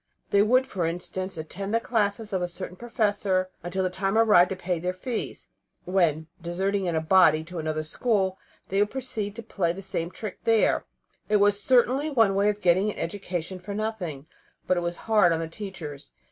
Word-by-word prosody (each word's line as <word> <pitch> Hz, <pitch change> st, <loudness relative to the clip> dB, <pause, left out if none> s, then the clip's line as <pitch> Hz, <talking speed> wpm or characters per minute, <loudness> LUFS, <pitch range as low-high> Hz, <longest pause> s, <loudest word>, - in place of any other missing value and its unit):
They 200 Hz, -, +5 dB
would, 255 Hz, +5 st, +4 dB
for 180 Hz, -9 st, -2 dB
instance, 185 Hz, +2 st, -4 dB
attend 195 Hz, +7 st, -4 dB
the -, -, +4 dB
classes 215 Hz, -2 st, -1 dB
of 185 Hz, -, 0 dB
a 180 Hz, -, 0 dB
certain 175 Hz, 0 st, -7 dB
professor 205 Hz, -4 st, 0 dB
until 185 Hz, +2 st, -2 dB
the 185 Hz, -, 0 dB
time 195 Hz, +3 st, 0 dB
arrived 210 Hz, -6 st, +6 dB
to 190 Hz, -, -2 dB
pay 180 Hz, -2 st, -2 dB
their 180 Hz, +2 st, -2 dB
fees, 230 Hz, +5 st, -5 dB, 0.4 s
when, 170 Hz, -4 st, +2 dB, 0.2 s
deserting 190 Hz, +3 st, -1 dB
in 170 Hz, -2 st, 0 dB
a 160 Hz, -, +1 dB
body 160 Hz, -2 st, +5 dB
to 175 Hz, +1 st, -7 dB
another 155 Hz, 0 st, -2 dB
school, 190 Hz, +2 st, 0 dB, 0.3 s
they 195 Hz, -, +1 dB
would 205 Hz, 0 st, +3 dB
proceed 220 Hz, -6 st, -3 dB
to 230 Hz, -, -7 dB
play 180 Hz, -6 st, -1 dB
the 195 Hz, +2 st, -8 dB
same 170 Hz, -2 st, -3 dB
trick 210 Hz, +2 st, -7 dB
there. 225 Hz, -1 st, +3 dB, 0.4 s
It 210 Hz, -, +3 dB
was 205 Hz, 0 st, +4 dB
certainly 260 Hz, +5 st, +3 dB
one 225 Hz, -8 st, +3 dB
way 200 Hz, +1 st, +3 dB
of 210 Hz, 0 st, -2 dB
getting 185 Hz, +4 st, +3 dB
an -, -, -11 dB
education 180 Hz, 0 st, -4 dB
for 200 Hz, +3 st, -6 dB
nothing, 195 Hz, -10 st, -3 dB, 0.4 s
but 185 Hz, -, +2 dB
it -, -, +1 dB
was 175 Hz, 0 st, -3 dB
hard 210 Hz, -6 st, +5 dB
on 165 Hz, -, -1 dB
the 165 Hz, -, -3 dB
teachers. 160 Hz, -6 st, -8 dB
190 Hz, 200 wpm, -26 LUFS, 175-210 Hz, 0.4 s, arrived